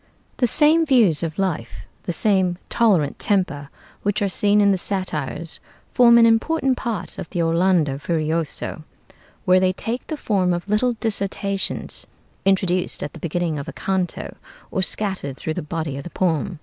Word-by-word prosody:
The 250 Hz, -, +2 dB
same 310 Hz, +6 st, +5 dB
views 235 Hz, -, +4 dB
of 165 Hz, -2 st, -4 dB
life, 150 Hz, -, -3 dB, 0.2 s
the -, -, -1 dB
same 185 Hz, -2 st, +2 dB
tolerant 195 Hz, -11 st, +2 dB
temper, 145 Hz, -9 st, 0 dB, 0.3 s
which 205 Hz, +1 st, 0 dB
are -, -, +2 dB
seen 205 Hz, +2 st, +2 dB
in 200 Hz, -1 st, +5 dB
the 195 Hz, -, +2 dB
'Satires,' 170 Hz, -5 st, -3 dB, 0.3 s
form 235 Hz, -1 st, +6 dB
an 230 Hz, -, +7 dB
important 260 Hz, +4 st, +2 dB
part 230 Hz, -8 st, -3 dB
of -, -, -6 dB
the 170 Hz, -, -1 dB
'Orlando 165 Hz, -4 st, +2 dB
Furioso,' 160 Hz, 0 st, -2 dB, 0.6 s
where 185 Hz, 0 st, +5 dB
they 185 Hz, 0 st, +2 dB
take 230 Hz, +6 st, -4 dB
the 310 Hz, -, -4 dB
form 190 Hz, -8 st, +1 dB
of 175 Hz, +2 st, -4 dB
little 215 Hz, +4 st, +1 dB
dissertations, 200 Hz, -3 st, -2 dB, 0.4 s
introduced 185 Hz, -2 st, +1 dB
at 145 Hz, -, -5 dB
the -, -, -10 dB
beginning 170 Hz, -2 st, -2 dB
of 140 Hz, -, -7 dB
a -, -, -6 dB
canto, 190 Hz, -2 st, -3 dB, 0.4 s
or 190 Hz, -, -1 dB
scattered 185 Hz, -8 st, -2 dB
through 160 Hz, -, -3 dB
the -, -, -4 dB
body 155 Hz, -2 st, -4 dB
of 140 Hz, -, -6 dB
the -, -, -7 dB
poem. 175 Hz, 0 st, -1 dB
185 Hz, 165 wpm, -22 LUFS, 165-210 Hz, 0.6 s, an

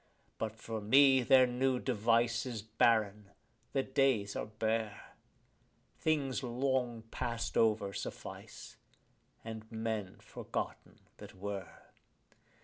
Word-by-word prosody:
But 110 Hz, -1 st, -3 dB
for 110 Hz, 0 st, -5 dB
me 135 Hz, +5 st, +6 dB
their 130 Hz, +1 st, +6 dB
new 125 Hz, +1 st, +1 dB
device 115 Hz, 0 st, +1 dB
is 115 Hz, -5 st, -5 dB
barren, 105 Hz, -2 st, +2 dB, 0.4 s
the 135 Hz, -, +1 dB
days 130 Hz, -7 st, +1 dB
are -, -, -3 dB
bare; 110 Hz, 0 st, -2 dB, 0.9 s
Things 140 Hz, -5 st, 0 dB
long 125 Hz, -2 st, -1 dB
past 115 Hz, -1 st, -3 dB
over 105 Hz, -3 st, +2 dB
suffice, -, -, -8 dB, 0.7 s
and 110 Hz, -1 st, -7 dB
men 110 Hz, -4 st, -3 dB
forgotten -, -, -6 dB, 0.2 s
that -, -, -11 dB
were. 100 Hz, -1 st, -6 dB
115 Hz, 105 wpm, -33 LUFS, 110-130 Hz, 0.9 s, me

